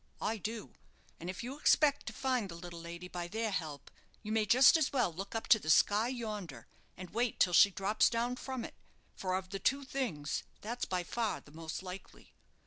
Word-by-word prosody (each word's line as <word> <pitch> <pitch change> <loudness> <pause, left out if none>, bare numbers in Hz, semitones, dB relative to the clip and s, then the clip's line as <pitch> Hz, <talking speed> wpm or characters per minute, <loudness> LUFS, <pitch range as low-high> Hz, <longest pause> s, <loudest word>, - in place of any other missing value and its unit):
I 225 - -1
do; 215 +2 -5 0.5
and 175 - -6
if 185 +4 -5
you 265 +4 -6
expect 290 -1 +4
to - - -2
find 255 -6 0
the 170 - -7
little 170 0 -8
lady 170 +1 -7
by 175 -1 -5
their 220 +3 -2
help, 155 -7 -4 0.3
you 215 - -5
may 220 -1 +2
just 255 +8 +7
as 315 -4 +2
well 250 -11 +1
look 195 +6 -6
up 225 - -3
to 220 - +7
the 155 - -6
sky 210 +8 +5
yonder, 215 - -5 0.3
and 180 -2 -8
wait 235 +2 0
till 180 - +4
she 200 - +8
drops 195 +2 +2
down 240 +2 -1
from 260 -3 -4
it, - - -9 0.4
for 185 -1 -1
of 185 0 -4
the 195 - -3
two 275 +8 +1
things 235 - -2 0.2
that's 240 +3 -3
by 180 -1 -1
far 225 +4 -2
the 145 - -18
most 160 +3 -6
likely. 185 +1 -10
205 Hz, 210 wpm, -33 LUFS, 180-240 Hz, 0.5 s, she